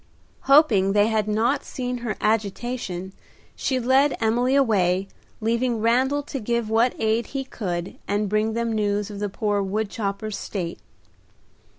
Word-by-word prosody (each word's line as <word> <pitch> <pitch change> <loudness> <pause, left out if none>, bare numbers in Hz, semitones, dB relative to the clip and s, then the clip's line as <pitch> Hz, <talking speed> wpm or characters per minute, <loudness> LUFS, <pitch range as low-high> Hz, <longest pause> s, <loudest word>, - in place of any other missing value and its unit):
Hoping 225 -10 +5
they 205 +1 +4
had 215 -2 0
not 230 +6 +1
seen 250 -1 -4
her 235 -2 -3
agitation, 210 -3 -2 0.4
she 260 -2 -1
led 265 +4 +3
Emily 240 +4 +2
away, 195 -8 +2 0.3
leaving 235 +1 0
Randal 260 +6 +2
to 280 -1 -5
give 235 -1 -1
what 230 +3 +3
aid 220 +1 +1
he 275 -1 -3
could 180 -9 -4
and 205 +1 0
bring 215 +2 +1
them 230 0 -1
news 205 -1 0
of 200 - -7
the 205 0 -2
poor 205 +1 0
wood 200 +2 -2
chopper's 200 0 -3
state. 175 -4 -4
220 Hz, 150 wpm, -24 LUFS, 205-245 Hz, 0.4 s, Hoping